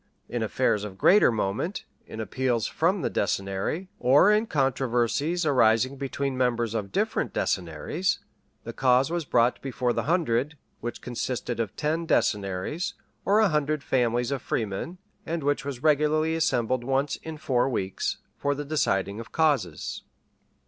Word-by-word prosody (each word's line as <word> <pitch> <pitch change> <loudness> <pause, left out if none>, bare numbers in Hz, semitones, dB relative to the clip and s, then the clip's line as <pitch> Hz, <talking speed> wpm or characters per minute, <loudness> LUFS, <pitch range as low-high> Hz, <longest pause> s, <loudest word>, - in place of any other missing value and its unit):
In - - -3
affairs 105 - +1
of 100 -3 -7
greater 190 - +6
moment, 110 - -2 0.2
in 110 - -8
appeals 120 0 -1
from 175 +1 0
the - - +1
decennary, 100 - -1
or 145 +11 +5
in 215 +2 +2
controversies 135 - 0
arising 130 -2 +3
between 135 0 -2
members 120 -3 0
of 105 -3 -3
different - - -1
decennaries, 90 - -1 0.5
the - - -7
cause 130 +3 +3
was 170 -2 -1
brought 120 -1 +2
before 125 -2 -1
the - - 0
hundred, 150 -4 +1 0.2
which 120 0 -5
consisted 120 -1 -3
of 110 -3 -2
ten 160 +2 -1
decennaries, 100 - 0 0.3
or 205 +2 +4
a 215 - +4
hundred 150 -1 0
families 120 0 +1
of 140 - -2
freemen, 110 - -3 0.3
and 165 -1 -3
which 145 +1 0
was 140 -2 -6
regularly 155 +1 +3
assembled 130 -6 +1
once 135 +3 0
in 160 -1 -8
four 135 -4 +1
weeks, 95 -6 -2 0.2
for 145 0 -1
the 145 +1 -5
deciding 100 -9 0
of 115 - -9
causes. 135 - 0
130 Hz, 150 wpm, -26 LUFS, 115-155 Hz, 0.5 s, greater